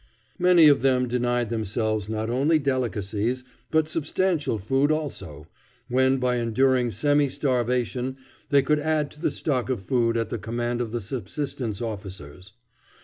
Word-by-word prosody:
Many 175 -3 +6
of 145 -2 +5
them 130 -2 +2
denied 120 -1 0
themselves 110 -1 -1
not 110 0 -2
only 140 +7 +2
delicacies, 125 -3 -1 0.3
but 160 -1 +2
substantial 155 -4 0
food 135 +9 +1
also, 95 - -4 0.4
when 130 +2 +3
by 125 -1 0
enduring 125 +2 +2
semi 145 +3 +2
starvation 125 -1 -1 0.3
they 140 -1 +4
could 150 +2 +2
add 150 -1 0
to 150 - -16
the - - +2
stock 130 -5 -2
of 125 -7 -2
food 115 +2 +1
at 115 -1 -2
the 120 - -3
command 120 +2 -2
of 120 - -2
the 120 0 -3
subsistence 120 +1 -4
officers. 95 -4 -8
125 Hz, 145 wpm, -25 LUFS, 110-140 Hz, 0.4 s, Many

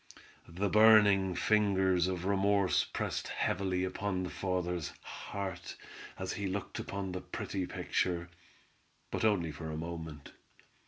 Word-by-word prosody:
The 95 +5 -1
burning 105 -3 +6
fingers 95 -4 +3
of 90 -1 -3
remorse 100 0 +3
pressed - - -3
heavily 95 -1 0
upon 95 0 -2
the 90 - -4
father's 90 -3 -2
heart 95 -3 -6 0.4
as - - -3
he 100 +1 -3
looked 95 0 -4
upon 100 -1 -4
the 90 0 -4
pretty 95 -2 -4
picture—but 85 +3 -4
only 95 -7 +2
for 80 +1 -7
a 80 - -4
moment. 80 -3 -6
95 Hz, 120 wpm, -32 LUFS, 85-100 Hz, 0.4 s, burning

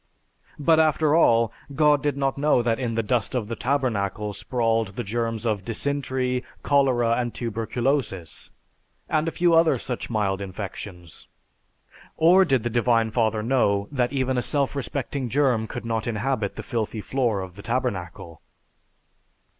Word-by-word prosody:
But 160 +2 +3
after 155 -1 +3
all, 115 -8 +4 0.2
God 150 -1 +4
did 145 -1 -1
not 135 -1 0
know 140 -3 +2
that 115 0 0
in 120 -3 -2
the 115 - 0
dust 120 +1 -1
of 115 -4 -1
the 115 - -4
Tabernacle 110 -6 -1
sprawled 115 -1 -1
the - - -3
germs 115 +1 -2
of 105 -4 0
Dysentery, 130 +1 -2 0.2
Cholera, 130 -5 +3
and 120 -1 -3
Tuberculosis, 115 - -2 0.6
and 155 +1 0
a - - 0
few 175 +1 +2
other 165 -4 +5
such 125 +1 -5
mild 100 -4 0
infections. 95 -3 -8 0.9
Or 180 +4 +6
did 135 -7 +1
the 120 - -1
Divine 115 -1 +2
Father 110 -2 +1
know 100 -5 +1
that 125 -3 0
even 130 -2 0
a - - 0
self 140 +2 -1
respecting 135 0 -3
germ 125 -4 +2
could - - -6
not 115 -1 -2
inhabit 115 -2 -1
the - - -6
filthy 110 -2 -3
floor 120 -5 0
of 90 -2 -8
the 100 - -10
Tabernacle? 95 - -3
120 Hz, 155 wpm, -24 LUFS, 110-135 Hz, 0.9 s, Or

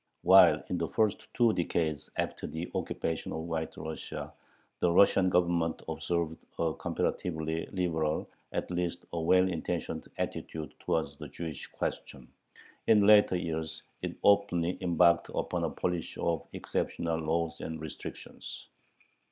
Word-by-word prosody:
While - - +7
in 90 - -1
the 85 - 0
first 110 +2 0
two 120 -3 +4
decades 80 -3 -1
after - - -2
the 80 +2 -5
occupation 80 0 -2
of 80 - -3
White 80 -1 -3
Russia 80 0 -6 0.5
the 90 - +3
Russian 95 +1 +5
Government 85 -2 +2
observed 85 -2 -1 0.2
a 80 -1 +1
comparatively 80 -1 -2
liberal, 80 -5 -1 0.2
at - - -3
least 85 -1 -2
a 85 - -1
well 90 +3 +5
intentioned, 85 -1 -3
attitude 80 -1 -4
towards 70 -3 -1
the 75 - -7
Jewish 80 +1 -6
question, 65 -3 -5 0.6
in 105 -2 +6
later 105 -2 +7
years 80 -2 -3 0.2
it - - -4
openly 90 -4 +3
embarked 85 -1 +4
upon - - -1
a - - 0
policy 90 -3 -3
of 85 -2 -1
exceptional 80 -1 -2
laws 80 +1 -1
and 80 -1 -5
restrictions. 80 -1 -8
85 Hz, 135 wpm, -30 LUFS, 80-90 Hz, 0.6 s, While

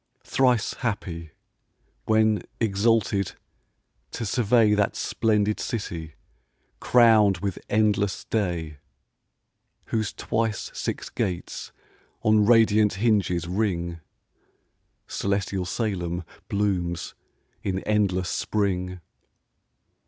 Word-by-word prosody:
Thrice 125 -5 +2
happy, 90 -8 -3 0.8
when 110 -2 +3 0.2
exalted 105 -2 +1 0.8
to 115 - -5
survey 115 -1 +3
That 105 -1 +1
splendid 105 -1 +1
city, 85 -8 -4 0.6
crown'd 110 -5 +5
with 95 0 -3
endless 105 -2 +1
day, 85 -8 -2 1.1
Whose 110 -2 0
twice 110 -2 -2
six - - -4
gates 90 -2 -3 0.5
on 110 -1 +4
radiant 110 -3 +5
hinges 95 -5 +1
ring: 85 -3 -1 1.1
Celestial 100 -1 -1
Salem 90 -4 -2 0.3
blooms 90 -4 -1 0.5
in 95 -1 -2
endless 95 -4 +1
spring. 90 -3 -1
100 Hz, 80 wpm, -25 LUFS, 90-110 Hz, 1.1 s, crown'd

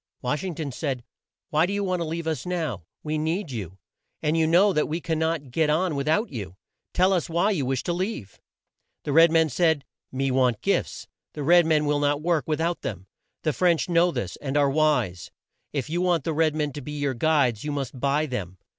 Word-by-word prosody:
Wash 150 +7 -1
ing 185 -4 -4
ton 145 -3 -4
said, 130 -2 -3 0.5
"Why 155 +2 +3
do 200 - -3
you 200 0 -1
want 185 -2 -1
to 170 - -2
leave 165 +1 -4
us 160 -2 -2
now? 160 - -3 0.2
We 155 0 -2
need 160 +1 -2
you, 95 -6 -6 0.5
and 155 +1 +1
you 160 -1 +3
know 185 +5 +5
that 150 - +1
we 160 +3 -2
can 160 -2 -2
not 160 -5 -1
get 155 +3 +1
on 160 +1 +1
with 140 +1 -2
out 210 +8 +2
you. 100 -8 -6 0.4
Tell 185 +2 +3
us 175 -2 0
why 175 +6 +2
you 145 -10 -1
wish 130 -1 -1
to 175 - -1
leave." 175 - -4 0.6
The 145 - -2
red 165 +2 +7
man 160 -1 +4
said, 155 0 +1 0.3
"Me 135 0 -1
want 125 -4 +2
gifts. - - -1 0.3
The 150 - -5
red 170 +2 +5
men 155 -2 +3
will 145 0 +1
not 145 0 +1
work 165 -1 0
with 155 -1 -1
out 170 +1 -1
them. 95 -3 -5 0.4
The 155 - +1
French 175 +1 +2
know 170 +1 +4
this, 95 - -4
and 145 0 -2
are 140 -1 +3
wise. 130 - +1 0.4
If 140 -2 -2
you 170 +3 -1
want 175 -5 +2
the 165 - -1
red 155 0 +2
men 150 -2 -1
to 145 - -6
be 150 +3 -7
your 145 -2 -1
guides, 130 -4 +2
you 150 - -3
must 135 -3 -4
buy 140 +3 +1
them. 100 - -5
155 Hz, 225 wpm, -25 LUFS, 135-170 Hz, 0.6 s, red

